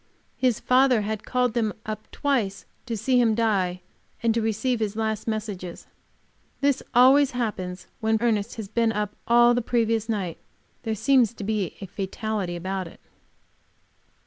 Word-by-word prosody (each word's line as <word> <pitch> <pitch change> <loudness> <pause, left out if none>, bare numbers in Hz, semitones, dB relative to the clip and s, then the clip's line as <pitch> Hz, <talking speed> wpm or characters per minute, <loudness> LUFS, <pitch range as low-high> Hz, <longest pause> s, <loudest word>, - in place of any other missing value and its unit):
His 250 -4 +1
father 255 -2 +4
had 215 0 -4
called 250 -2 +1
them 220 -3 0
up 215 -1 -6
twice 230 -9 -1 0.2
to 230 -2 -2
see 245 +4 +3
him 225 -2 +3
die 190 -6 +1 0.4
and 230 -1 +3
to 230 - 0
receive 225 +3 0
his 215 -2 -2
last 220 -1 -2
messages. 205 -5 -4 0.7
This 280 -1 +2
always 265 +3 +6
happens 185 -6 -3
when 220 0 +2
Ernest 215 -3 0
has 220 -3 -6
been 230 +2 +1
up 210 -1 -3
all 240 +1 +6
the 245 - +1
previous 225 -1 0
night; 195 -7 -2 0.4
there 220 -2 -2
seems 245 -1 +3
a 205 -3 -1 0.2
fatality 195 0 -3
about 185 +1 -3
it. - - -14
220 Hz, 145 wpm, -25 LUFS, 200-240 Hz, 0.7 s, always